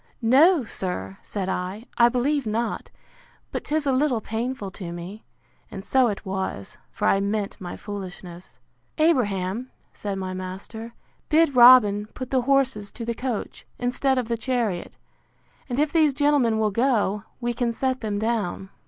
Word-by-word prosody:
No, 285 +7 +5
sir, 95 - -5
said 195 -3 -4
I, 190 +4 -3
I 235 0 +6
believe 260 +2 0
not; 225 +2 -2 0.6
but - - -3
'tis 305 0 0
a 275 - +2
little 260 -2 +2
painful 225 -1 -4
to 180 -4 -7
me. 175 +5 -8 0.5
And 195 0 -8
so 260 -2 +4
it 205 -3 -4
was; 190 - -4
for - - -1
I 195 - +4
meant 200 0 -2
my 175 -1 -6
foolishness! 185 -3 -8 0.4
Abraham, 240 - +1 0.2
said 200 -2 -4
my 185 -1 -4
master, 195 +5 -7 0.3
bid 315 -3 +4
Robin 240 -5 +7
put 255 -1 -6
the 260 -1 +3
horses 265 -6 +1
to 230 - -6
the 235 - -1
coach, 245 -2 -5
instead 255 +2 0
of 250 -3 -1
the 230 0 -1
chariot; 230 -7 -2 0.7
and 245 - -2
if 295 +1 +1
these 310 -5 +4
gentlemen 285 -6 +3
will 215 -1 +1
go, 210 -3 +1 0.2
we 240 -1 -1
can 235 0 0
set 260 +2 -1
them 210 -3 -2
down. 210 -3 -2
230 Hz, 160 wpm, -24 LUFS, 195-255 Hz, 0.7 s, Robin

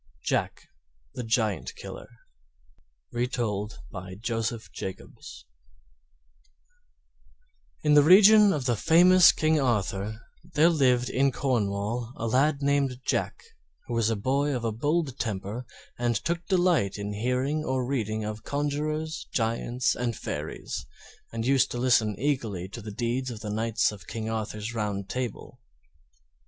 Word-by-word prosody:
JACK - - -1 0.5
THE 125 - -5
GIANT 110 -3 -1
KILLER - - -9 1.0
Retold 110 - -2
by 95 0 -7
Joseph 115 +1 -3
Jacobs 95 -1 -8 2.4
In 150 -1 +4
the 145 - +8
reign 205 +6 +8
of 145 -7 -2
the 120 -2 +2
famous 175 - +6
King 155 0 +1
Arthur 105 -4 -1 0.4
there 160 +3 +6
lived 125 -6 +3
in 135 +1 +2
Cornwall 115 -2 -1
a 115 - -4
lad 140 +5 +2
named 140 -3 +1
Jack, - - -1 0.4
who 120 - -5
was 115 -1 +2
a 115 - +1
boy 135 +6 0
of 120 - -3
a 115 - 0
bold 145 +4 -1
temper 110 +2 -4 0.3
and 120 -1 +1
took 170 +10 -2
delight 175 - +2
in 100 0 -4
hearing 125 +7 -1
or 130 -3 -1
reading 110 -5 -2
of 105 0 -5
conjurers, 150 +3 -2
giants, 115 +2 0
and 120 -2 -2
fairies; - - -5 0.5
and 115 0 -3
used 135 0 +3
to - - -5
listen 120 -5 +2
eagerly 115 -10 -1
to 110 +5 -9
the 105 - -7
deeds 120 +5 -2
of 115 -3 -7
the 105 -1 -4
knights 115 +1 +1
of 100 -5 -12
King 110 0 -4
Arthur's 110 +1 -4
Round 105 -3 -3
Table. 125 0 -5
120 Hz, 135 wpm, -27 LUFS, 110-140 Hz, 2.4 s, the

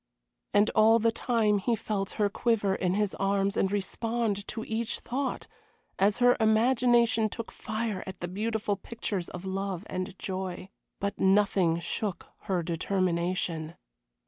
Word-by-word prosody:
And 205 +1 +4
all 220 +1 +6
the 230 0 +2
time 225 -3 +1
he 230 +4 +1
felt 200 -2 -3
her 210 -2 +2
quiver 205 -1 +1
in 185 -1 0
his 210 -1 0
arms 195 0 +1
and 190 - +1
respond 210 +1 -1
to 225 0 -4
each 225 +1 -2
thought, 265 +3 -3 0.5
as 200 +2 +3
her 245 0 +5
imagination 230 0 +3
took 230 +1 -6
fire 215 -2 -3
at 190 -1 -7
the 175 - -3
beautiful 210 +2 -1
pictures 200 -3 -4
of 180 +1 -8
love 190 -1 -3
and 185 +1 -4
joy. 185 -1 -4 0.3
But 200 +1 -3
nothing 190 -4 +3
shook 195 +2 -3 0.2
her 180 -3 0
determination. 170 -1 -1
200 Hz, 145 wpm, -29 LUFS, 190-225 Hz, 0.5 s, all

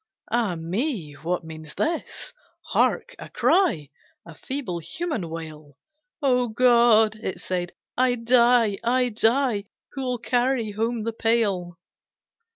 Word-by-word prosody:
Ah 225 -7 +1
me! 175 - -3
What 170 +4 -3
means 160 -1 -10
this? 330 0 -3 0.4
Hark, - - +1
a - - -9
cry, 170 - +2 0.3
A 170 - -11
feeble 240 - -4
human 190 - -4
wail, 155 -3 -9 0.5
"Oh 250 -2 +3
God!" 230 -2 +4
it 190 -4 -5
said 180 -1 -3 0.2
"I 250 0 +2
die, 235 -3 +3
I 250 +1 +2
die, 225 -1 +2 0.3
Who'll 255 -3 -2
carry 245 -1 0
home 225 +2 -2
the 230 +1 -2
pail?" 205 -7 0
225 Hz, 120 wpm, -24 LUFS, 175-250 Hz, 0.5 s, God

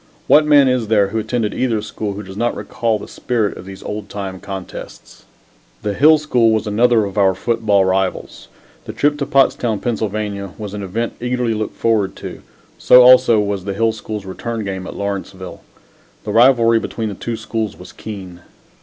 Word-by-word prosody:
What 150 0 +5
man 145 -2 +6
is 125 -3 0
there 105 -2 +3
who 110 +2 -2
attended 110 -1 -2
either 120 -4 0
school 105 -1 -5
who 105 +2 -7
does 95 0 -10
not 120 +3 -1
recall 115 -2 -2
the - - -10
spirit 115 -5 -2
of 95 - -11
those 95 -1 -10
old 105 -1 -6
time 95 -2 -6
contests? 95 -2 -9 0.6
The 105 - -1
Hill 155 +7 +6
School 125 -7 +2
was 110 0 +1
another 110 +1 +3
of 100 +1 -4
our 95 -2 +3
football 110 -5 +1
rivals. 95 0 -2 0.4
The - - -7
trip 145 0 +1
to 140 - -2
Pottstown, 130 -6 +2
Pa., 120 - -1 0.7
was 105 -2 -7
an 105 - -5
event 110 +5 -3
eagerly 125 -1 -1
looked 110 0 -4
forward 110 -4 +1
to - - -8 0.4
so 125 0 +7
also 125 -3 +6
was 100 -2 -2
the 100 -1 -3
Hill 115 +1 +2
School's 110 -2 -7
return 110 +3 -5
game 95 -2 -5
at - - -8
Lawrenceville. 100 -2 -5 0.6
The 105 - -4
rivalry 115 0 +5
between 110 -1 -4
the - - -5
two 115 +3 -5
schools 110 -1 -4
was 90 - -12
keen. 95 -5 -9
110 Hz, 185 wpm, -18 LUFS, 100-120 Hz, 0.7 s, so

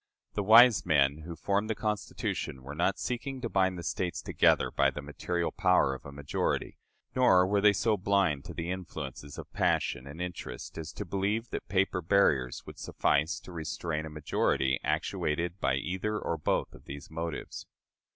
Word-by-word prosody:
" - - -55
The 105 - -1
wise 115 +3 +7
men 70 -3 +3
who 85 - -5
formed 100 +5 0
the 110 - 0
Constitution 105 - -3
were 70 +2 -7
not 90 +5 +1
seeking 130 +2 -3
to 115 - -2
bind 95 -2 +2
the 85 - -6
States 90 0 -2
together - - +3
by 70 - +3
the 70 +2 -7
material 85 +4 -2
power 90 -8 +3
of 65 - -9
a - - -8
majority; 70 0 -2 0.4
nor 95 -8 +5
were 100 +1 +2
they 105 0 +7
so 110 +1 +1
blind 95 -7 +1
to - - -8
the 85 +2 -3
influences 75 -6 -6
of - - -9
passion 65 - 0
and 75 +4 -9
interest 85 -9 -6
as 80 -1 -6
to 105 - -5
believe 100 +5 -1
that - - -4
paper 95 -1 +1
barriers 80 -9 +2
would - - -11
suffice 80 +6 +1
to - - -11
restrain 80 -1 -3
a - - -7
majority 70 -3 0
actuated 85 +4 -1
by - - +1
either 95 +9 -2
or 85 - -2
both 75 - -1
of - - -15
these 70 +2 -9
motives. 80 0 -5
85 Hz, 180 wpm, -30 LUFS, 75-100 Hz, 0.4 s, wise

